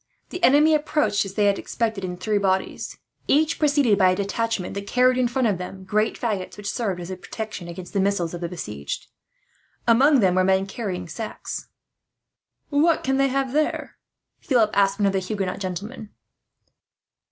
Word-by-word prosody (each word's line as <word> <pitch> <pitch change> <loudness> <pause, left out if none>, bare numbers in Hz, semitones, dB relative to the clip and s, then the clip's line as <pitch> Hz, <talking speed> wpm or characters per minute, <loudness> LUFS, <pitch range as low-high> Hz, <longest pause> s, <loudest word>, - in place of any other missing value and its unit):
The 360 0 -6
enemy 300 +4 +6
approached 295 -10 +1
as 195 0 -8
they 210 - +3
had 200 -1 +2
expected, 220 -4 -2
in 180 -1 -4
three 210 +2 0
bodies; 190 -1 -1 0.3
each 310 +2 +2
preceded 285 -8 +3
by 185 -1 +6
a 185 - +2
detachment 200 0 -2
that 200 0 -5
carried 250 +2 +4
in 250 -1 +2
front 250 0 +1
of 200 -4 0
them 190 +1 -7
great 215 +3 0
faggots, 210 -6 -3
which 205 -1 -4
served 205 -7 -2
as 175 +1 -6
a - - -3
protection 215 -1 -7
against 175 +1 -8
the 200 - +1
missiles 190 -4 0
of 175 - -6
the 170 - -3
besieged. 105 - -5 0.8
Among 265 +5 +5
them 190 -5 +3
were 185 0 +3
men 190 +1 +3
carrying 195 -4 -4
sacks. 215 +7 -6 1.0
"What 310 +3 +3
can 265 0 +1
they 275 0 +3
have 270 -1 -1
there?" 305 +1 -1 0.4
Philip 230 -6 +2
asked 195 -1 +3
one 205 - +1
of 195 - +2
the 190 - +2
Huguenot 190 -1 -3
gentlemen. 200 +4 -5
205 Hz, 180 wpm, -24 LUFS, 190-250 Hz, 1.0 s, enemy